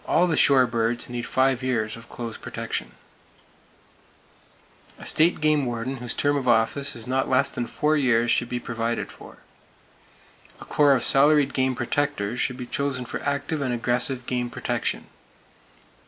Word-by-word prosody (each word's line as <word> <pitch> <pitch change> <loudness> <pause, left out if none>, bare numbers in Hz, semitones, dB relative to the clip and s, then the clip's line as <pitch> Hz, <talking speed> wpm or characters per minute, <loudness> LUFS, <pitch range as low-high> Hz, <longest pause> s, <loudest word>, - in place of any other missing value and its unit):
All 175 - +3
the 165 -3 0
shore 135 -2 +5
birds 115 0 -1
need 120 -1 -4
five 130 -1 +1
years 115 -4 -1
of 115 +1 -13
close 115 -3 -6
protection. - - -5 2.0
A - - -11
State 165 +3 +3
Game 155 -1 +2
Warden 120 +3 -3
whose 120 -1 -3
term 145 0 +1
of 130 -2 -3
office 120 +4 +2
is 115 -1 -5
not 130 +1 -1
less 130 0 +3
than 120 - -4
four 150 +1 0
years 120 -5 +2
should 120 - +1
be 125 - -2
provided 115 -1 -3
for. - - -13 1.2
A - - -10
corps 145 -2 +4
of 125 - 0
salaried 145 0 +4
game 130 -1 +1
protectors 120 -3 -2
should 125 - -1
be 125 - -6
chosen 135 -1 -2
for - - -5
active 140 +2 -2
and 130 -3 -1
aggressive 125 +2 0
game 125 -1 -2
protection. - - -2
125 Hz, 160 wpm, -24 LUFS, 120-140 Hz, 2.0 s, shore